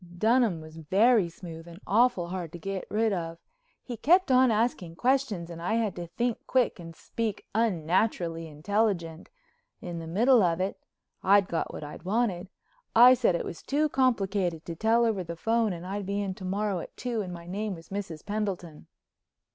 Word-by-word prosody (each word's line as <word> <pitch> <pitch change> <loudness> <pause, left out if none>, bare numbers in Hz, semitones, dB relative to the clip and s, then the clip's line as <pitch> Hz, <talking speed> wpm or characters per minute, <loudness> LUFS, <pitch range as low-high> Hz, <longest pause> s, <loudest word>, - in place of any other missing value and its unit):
Dunham 220 -4 +3
was 155 +1 -12
very 195 +5 +3
smooth 165 -1 -10
and 170 +1 -11
awful 210 -5 +2
hard 175 -3 -5
to - - -6
get 195 +2 -5
rid 220 +1 +1
of. 165 -2 -4 0.5
He 240 -3 -6
kept 345 - +4
on 255 0 +6
asking 215 -7 0
questions 240 -7 0
and 165 0 -8
I 180 +6 0
had 220 -4 0
to 175 -1 -6
think 235 +7 -2
quick 250 -6 +1
and 165 -1 -9
speak 220 +1 -4
unnaturally 175 -4 0
intelligent. 170 +1 -1 0.5
In 175 -2 -6
the 165 - -7
middle 235 +8 +4
of 170 -2 +2
it—I'd 195 +1 0
got 165 - -2
what - - -7
I 150 - -7
wanted—I 230 - +2
said 235 -8 +2
it - - -2
was 170 - -7
too 300 +2 0
complicated 195 - 0
to 170 - -5
tell 225 +5 +3
over 210 -5 0
the 170 0 -6
phone 225 +4 +1
and 175 0 -6
I'd 195 +1 -4
be 200 +1 -1
in 195 -2 -2
to 185 - -9
morrow 200 0 -1
at - - -10
two 240 -3 -2
and 185 -3 -5
my 170 -1 -8
name 200 +3 -3
was 165 0 -14
Mrs. 190 -6 -6
Pendleton. 195 - -4
195 Hz, 180 wpm, -28 LUFS, 170-225 Hz, 0.5 s, on